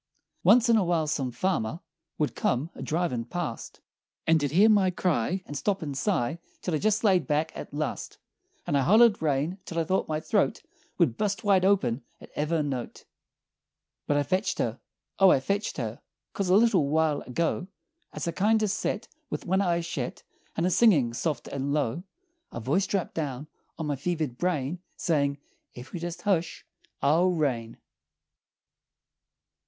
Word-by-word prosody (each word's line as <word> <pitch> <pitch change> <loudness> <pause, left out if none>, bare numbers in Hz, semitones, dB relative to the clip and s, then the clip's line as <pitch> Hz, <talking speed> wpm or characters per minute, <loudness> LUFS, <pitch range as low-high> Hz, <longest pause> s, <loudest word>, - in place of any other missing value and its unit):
"Once 245 0 +6
in 230 -1 +5
a 210 - +3
while 170 -3 +1
some 140 -4 -1
farmer 135 0 -1 0.4
Would 150 - -1
come 135 +7 0
a - - -10
driven' 160 -7 -1
past 140 -1 -5 0.4
And 160 -1 +4
he'd 145 - 0
hear 190 +9 +5
my 205 -4 +4
cry, 180 0 0
And 145 - -8
stop 190 +6 -1
and 145 -3 -4
sigh 160 - 0 0.2
Till 180 - -2
I 155 - +1
jest 215 +4 +1
laid 190 -5 +3
back, 155 +1 0
at - - -8
last, 150 0 -4 0.5
And - - 0
I 140 - +4
hollered 215 - +5
rain 155 +5 0
till 165 - -7
I 165 - +2
thought 185 +4 0
my 155 -1 -1
throat - - 0 0.3
Would 115 - +2
bust 210 +2 -1
wide 195 -3 +4
open 185 -11 +2 0.2
at - - -14
ever' 155 +1 0
note! 130 -4 -5 1.0
"But 145 - +2
I 145 - +2
fetched 185 +8 0
her! - - -1 0.4
O 195 -1 +7
I 135 - +5
fetched 200 +10 -2
her! 115 -4 -4 0.3
'Cause 195 -2 -2
a 185 - +5
little 210 -10 +4
while 155 -1 +2
ago, 165 +7 -1 0.4
As - - -5
I - - +1
kindo' 215 +5 +2
set 210 +2 -2 0.2
With - - -4
one 190 +2 +2
eye 170 -3 +1
shet, 160 -7 -5 0.3
And 165 - 0
a 185 - +2
singin' 160 - +4
soft 150 +5 -2
and 140 +1 -2
low, 145 0 0 0.5
A - - -5
voice 150 - +1
drapped 195 -4 -2
down 145 -2 -4 0.3
on 160 - -3
my 145 -1 -1
fevered 155 -2 -2
brain 170 -2 -1 0.2
Sayin', 140 -5 +1 0.4
'Ef 125 +5 -11
you'll 175 - -5
jest 175 0 -5
hush 175 -5 0 0.4
I'll 165 +6 +4
rain!'" 125 -8 -1
165 Hz, 170 wpm, -27 LUFS, 140-185 Hz, 1.0 s, O